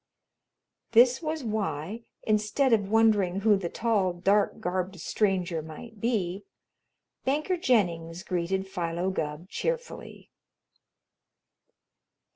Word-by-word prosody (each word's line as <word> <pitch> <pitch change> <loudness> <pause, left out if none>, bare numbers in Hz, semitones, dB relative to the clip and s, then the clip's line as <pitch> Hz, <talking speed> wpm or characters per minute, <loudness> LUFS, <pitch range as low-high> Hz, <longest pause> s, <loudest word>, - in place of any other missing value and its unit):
This 245 +2 +6
was 315 -2 -3
why, 210 -1 -3 0.2
instead 215 +5 +2
of 205 -3 +2
wondering 205 -4 +3
who 215 0 +5
the 185 -3 -3
tall, 210 -5 +1
dark 195 +4 +1
garbed 185 +1 -2
stranger 180 -3 0
might 180 +8 -10
be, 205 -5 -1 0.8
Banker 305 +7 0
Jennings 175 - 0
greeted 185 +2 -1
Philo 175 0 -2
Gubb 155 -1 -4
cheerfully. 485 - -5
195 Hz, 95 wpm, -28 LUFS, 175-225 Hz, 0.8 s, This